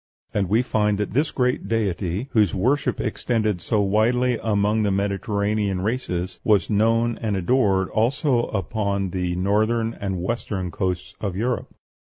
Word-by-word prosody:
And 100 -4 0
we 110 +4 +3
find 105 -4 +1
that 105 -1 -3
this 145 +5 +2
great 125 -1 0
deity, 100 - -1
whose 105 -5 +3
worship 130 +10 +1
extended 110 -6 -1
so 105 +4 +1
widely 115 +5 +2
among 105 0 +1
the 105 - +1
Mediterranean 100 0 0
races, 95 -5 -2
was 105 -4 +2
known 115 +2 +2
and 105 -4 -1
adored 95 -2 +2
also 120 +2 +1
upon 100 0 -2
the 90 -1 -1
northern 110 +5 +1
and 95 -4 -4
western 95 -2 -3
coasts 90 0 -3
of 100 -4 -2
Europe. 120 +5 -2
105 Hz, 145 wpm, -23 LUFS, 95-115 Hz, -, we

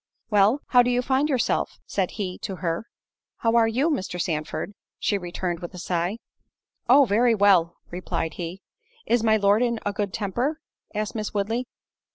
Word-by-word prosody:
"Well—how 220 +5 +4
do 245 - +1
you 245 0 +1
find 270 +4 +1
yourself?" 255 -5 0
said 190 -3 -1
he 185 -4 -3
to 195 - -4
her. 175 +4 -3 0.5
"How 230 0 +1
are 230 -1 +5
you, 265 +9 +1
Mr. 185 -9 -3
Sandford?" 160 +4 -2 0.2
she 205 - 0
returned, 175 -1 -3
with 175 +2 -8
a - - -8
sigh. 175 +3 -1 0.7
"Oh! 275 +3 +7
very 230 +2 +3
well," 190 -5 +4 0.2
replied 170 -2 -3
he. 175 +2 -6 0.4
"Is 240 0 +2
my 220 -1 +4
Lord 200 +2 +3
in 235 -2 +1
a 205 - 0
good 200 -1 -2
temper?" 240 +9 -2 0.4
asked 215 +1 -2
Miss 215 -2 -4
Woodley. 225 +5 -1
205 Hz, 170 wpm, -25 LUFS, 180-240 Hz, 0.7 s, Oh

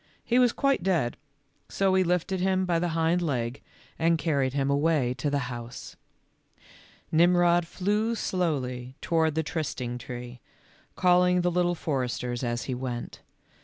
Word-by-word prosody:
He 245 +1 +2
was 245 -2 +5
quite 275 -4 +1
dead, 170 -10 0 0.5
so 195 -1 +1
he 190 0 +4
lifted 180 +2 0
him 190 0 +1
by 170 -2 +1
the 175 - 0
hind 165 +2 +2
leg 125 -6 -2 0.4
and 165 +1 +3
carried 140 -5 0
him 140 0 0
away 140 -3 +2
to 145 - 0
the 140 -2 -1
house. 120 +1 -8 1.2
Nirnrod 175 +1 +4
flew 210 +6 0
slowly 130 - -2
toward 160 -2 +1
the 160 - +1
trysting 130 -6 -3
tree, 120 0 -8 0.6
calling 180 0 +4
the 175 0 +1
Little 175 0 +1
Foresters 125 -5 -2
as 120 -1 -2
he 130 - -3
went. 125 -1 -5
160 Hz, 145 wpm, -27 LUFS, 125-180 Hz, 1.2 s, was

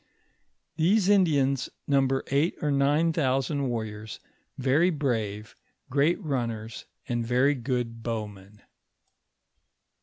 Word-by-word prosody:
These 190 +5 +3
Indians 145 -9 +3 0.2
num 140 -2 +3
ber 135 0 -1
eight 145 +5 +2
or 150 - 0
nine 145 +4 +2
thousand 135 -1 0
warriors, 110 -2 -5 0.4
veiy 140 +7 +3
brave, 110 - -2 0.4
great 145 +5 +2
run 130 -6 -1
ners, 110 0 -7 0.2
and 120 -1 -1
very 125 +5 +3
good 120 -3 -3
bowmen. 105 -3 -6
135 Hz, 110 wpm, -27 LUFS, 115-145 Hz, 0.4 s, These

